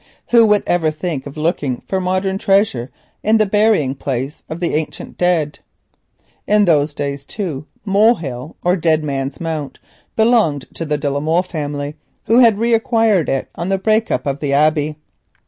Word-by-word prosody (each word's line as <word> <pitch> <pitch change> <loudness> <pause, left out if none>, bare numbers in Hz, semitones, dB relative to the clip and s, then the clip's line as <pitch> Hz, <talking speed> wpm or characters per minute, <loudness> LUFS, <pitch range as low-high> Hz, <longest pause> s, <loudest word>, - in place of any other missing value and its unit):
Who 230 -2 +6
would 210 -1 +3
ever 170 -3 +1
think 155 -2 -4
of 140 - -10
looking 150 -5 -1
for 190 -1 -1
modern 185 +1 -1
treasure 195 - +1 0.3
in 220 +2 +3
the 215 - +3
burying 205 -9 +2
place 135 +1 -4
of 160 - -5
the 175 - -1
ancient 155 0 -4
dead? 170 -5 0 0.9
In 210 0 +4
those 150 -3 +2
days, 140 -1 -3
too, 155 -5 -5 0.2
Molehill, 195 - +1
or 180 +1 +4
Dead 160 -3 +1
Man's 135 -1 -3
Mount, 155 -5 -4 0.4
belonged 220 - +2
to 165 - -5
the 150 -1 -1
de 145 0 -3
la 140 - -1
Molle 160 +4 +1
family, 145 -4 -5 0.3
who 230 +2 +4
had 230 -5 +6
re 230 +2 +1
acquired 225 - +2
it 135 - -1
on 170 +2 -4
the 195 - +2
break 220 +3 +1
up 125 - -1
of 140 0 -2
the 140 -2 -1
Abbey. 150 +1 +2
160 Hz, 175 wpm, -18 LUFS, 145-200 Hz, 0.9 s, Who